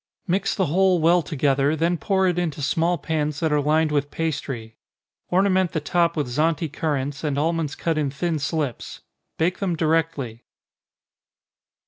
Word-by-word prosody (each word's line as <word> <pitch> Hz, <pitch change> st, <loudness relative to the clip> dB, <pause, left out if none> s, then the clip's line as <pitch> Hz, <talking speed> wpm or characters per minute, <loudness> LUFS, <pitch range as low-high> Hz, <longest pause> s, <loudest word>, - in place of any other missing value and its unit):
Mix 185 Hz, +2 st, 0 dB
the 190 Hz, -, +1 dB
whole 185 Hz, +3 st, +3 dB
well 170 Hz, +2 st, +4 dB
together, 145 Hz, -1 st, +1 dB
then 165 Hz, +3 st, +1 dB
pour 190 Hz, +2 st, +1 dB
it 175 Hz, -1 st, +1 dB
into 155 Hz, -4 st, -2 dB
small 170 Hz, +5 st, +1 dB
pans 150 Hz, -1 st, -2 dB
that 160 Hz, -2 st, 0 dB
are 150 Hz, -1 st, +3 dB
lined 155 Hz, +2 st, +2 dB
with 145 Hz, -1 st, 0 dB
pastry. 135 Hz, -9 st, -4 dB, 0.5 s
Ornament 185 Hz, -1 st, +2 dB
the 155 Hz, -, 0 dB
top 170 Hz, +2 st, +1 dB
with 150 Hz, -, +1 dB
Zante 155 Hz, +5 st, 0 dB
currants, 145 Hz, -3 st, -2 dB
and 145 Hz, -3 st, -1 dB
almonds 160 Hz, -1 st, 0 dB
cut 165 Hz, -2 st, -1 dB
in 145 Hz, -2 st, 0 dB
thin 160 Hz, +3 st, -2 dB
slips 145 Hz, -3 st, -3 dB, 0.4 s
bake 175 Hz, +3 st, 0 dB
them 185 Hz, -4 st, 0 dB
directly. 155 Hz, -7 st, -1 dB
160 Hz, 155 wpm, -23 LUFS, 145-170 Hz, 0.5 s, well